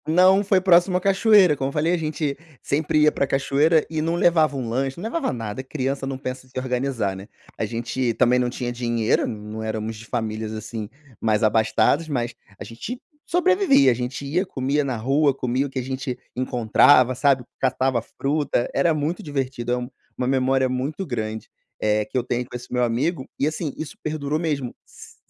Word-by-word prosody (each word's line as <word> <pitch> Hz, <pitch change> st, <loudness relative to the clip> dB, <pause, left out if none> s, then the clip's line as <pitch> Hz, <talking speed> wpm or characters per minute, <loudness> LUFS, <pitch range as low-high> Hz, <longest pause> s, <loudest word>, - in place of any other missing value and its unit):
Não, 185 Hz, +5 st, +5 dB
foi 195 Hz, -1 st, +3 dB
próximo 180 Hz, 0 st, +4 dB
à -, -, -3 dB
cachoeira, 195 Hz, -3 st, +5 dB
como 135 Hz, -1 st, -2 dB
eu -, -, -7 dB
falei, 155 Hz, +4 st, +1 dB
a -, -, +2 dB
gente 155 Hz, -3 st, -2 dB, 0.3 s
sempre 150 Hz, +1 st, +1 dB
ia 150 Hz, -, +5 dB
para 140 Hz, -, 0 dB
cachoeira, 145 Hz, +4 st, +2 dB
e 160 Hz, -1 st, -2 dB
não 165 Hz, +2 st, 0 dB
levava 160 Hz, -4 st, +3 dB
um 125 Hz, -3 st, -3 dB
lanche, 130 Hz, +3 st, -2 dB
não 175 Hz, -, -7 dB
levava 265 Hz, +6 st, -1 dB
nada, 115 Hz, +1 st, -5 dB
criança 135 Hz, 0 st, -3 dB
não 135 Hz, -1 st, -3 dB
pensa 130 Hz, 0 st, -6 dB
em -, -, -24 dB
se 130 Hz, -, -12 dB
organizar, 125 Hz, -5 st, -1 dB
né. 95 Hz, +2 st, -9 dB, 0.3 s
A -, -, -1 dB
gente 120 Hz, +2 st, -2 dB
também 125 Hz, +1 st, +3 dB
não 125 Hz, -1 st, +1 dB
tinha 120 Hz, 0 st, -4 dB
dinheiro, 120 Hz, -2 st, 0 dB
não 105 Hz, 0 st, -6 dB
éramos 110 Hz, 0 st, -3 dB
de 110 Hz, +2 st, -11 dB
famílias, 110 Hz, -2 st, -3 dB
assim, 110 Hz, 0 st, -6 dB, 0.3 s
mais 110 Hz, 0 st, +1 dB
abastadas, 110 Hz, +8 st, +2 dB
mas 120 Hz, -5 st, -2 dB, 0.3 s
a -, -, -5 dB
gente 175 Hz, -, -7 dB, 0.3 s
sobrevivia. 355 Hz, -, +4 dB
A -, -, +3 dB
gente 125 Hz, +3 st, -4 dB
ia, 165 Hz, +7 st, 0 dB
comia 145 Hz, -4 st, -1 dB
na 130 Hz, -4 st, -2 dB
rua, 135 Hz, +4 st, +2 dB
comia 130 Hz, +2 st, -1 dB
o -, -, -10 dB
que 135 Hz, -, -8 dB
a 130 Hz, -, -1 dB
gente 130 Hz, 0 st, -4 dB, 0.2 s
encontrava, 125 Hz, +1 st, +4 dB
sabe. 135 Hz, 0 st, +2 dB, 0.2 s
Catava 130 Hz, -2 st, +1 dB
fruta, 140 Hz, +1 st, -1 dB
era 160 Hz, +4 st, +3 dB
muito 155 Hz, +4 st, -2 dB
divertido, 135 Hz, -5 st, -3 dB
é 125 Hz, -, +2 dB
um 125 Hz, 0 st, -5 dB, 0.3 s
uma 125 Hz, -, -1 dB
memória 130 Hz, 0 st, +2 dB
muito 135 Hz, +8 st, -2 dB
grande, 110 Hz, -6 st, -4 dB, 0.3 s
eh, 105 Hz, 0 st, +1 dB
que -, -, -17 dB
eu 125 Hz, -, +1 dB
tenho 125 Hz, 0 st, -2 dB
com 125 Hz, -, -11 dB
esse 125 Hz, 0 st, -8 dB
meu 125 Hz, 0 st, +1 dB
amigo, 130 Hz, +5 st, -1 dB
e 140 Hz, -, +2 dB
assim, 155 Hz, -2 st, -3 dB
isso 155 Hz, -, -7 dB
perdurou 155 Hz, -1 st, -2 dB
mesmo. 145 Hz, -7 st, -2 dB
S -, -, -15 dB
130 Hz, 200 wpm, -23 LUFS, 120-155 Hz, 0.3 s, Não